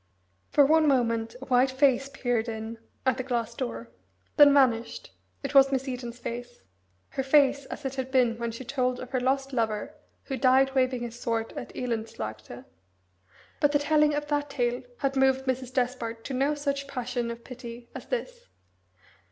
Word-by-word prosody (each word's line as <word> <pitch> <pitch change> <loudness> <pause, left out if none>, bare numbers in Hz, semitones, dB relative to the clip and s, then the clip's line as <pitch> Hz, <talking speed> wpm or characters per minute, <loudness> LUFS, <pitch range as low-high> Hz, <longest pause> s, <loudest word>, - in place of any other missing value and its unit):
For 285 - +5
one 315 +2 +4
moment 230 -4 +1
a - - -7
white 255 0 +3
face 270 0 +2
peered 245 -4 -1
in 220 +1 -6 0.3
at 260 -1 +2
the 260 - -2
glass 240 -3 -2
door 115 0 -5 0.4
then 290 -1 +8
vanished; 235 -5 +2 0.3
it 275 - -4
was 270 -1 +7
Miss 270 0 -1
Eden's 245 -2 -5
face 240 0 -7 0.5
her - - -2
face 280 0 +3
as 295 - -8
it 265 - -2
had 260 -1 -4
been 245 -3 +2
when 235 0 -2
she 230 +3 -7
told 255 -1 -1
of 255 0 -8
her 260 - +1
lost 270 +2 0
lover 220 -4 -1 0.3
who 270 - -4
died 265 +1 +4
waving 255 -2 +1
his 240 0 -7
sword 225 -1 -2
at - - -6
Elendslaagte! 120 - -5 0.9
But 290 0 +3
the - - +6
telling 300 0 +3
of 295 0 -2
that 290 -1 0
tale 245 -3 -1 0.2
had 275 -1 -1
moved 265 0 +3
Mrs. 260 -1 -2
Despard 245 -3 -2
to 275 - -4
no 275 +3 +1
such 280 -1 -2
passion 250 -3 -3
of 235 0 -7
pity 240 -1 -9
as - - -8
this. - - -4
255 Hz, 175 wpm, -27 LUFS, 235-275 Hz, 0.9 s, then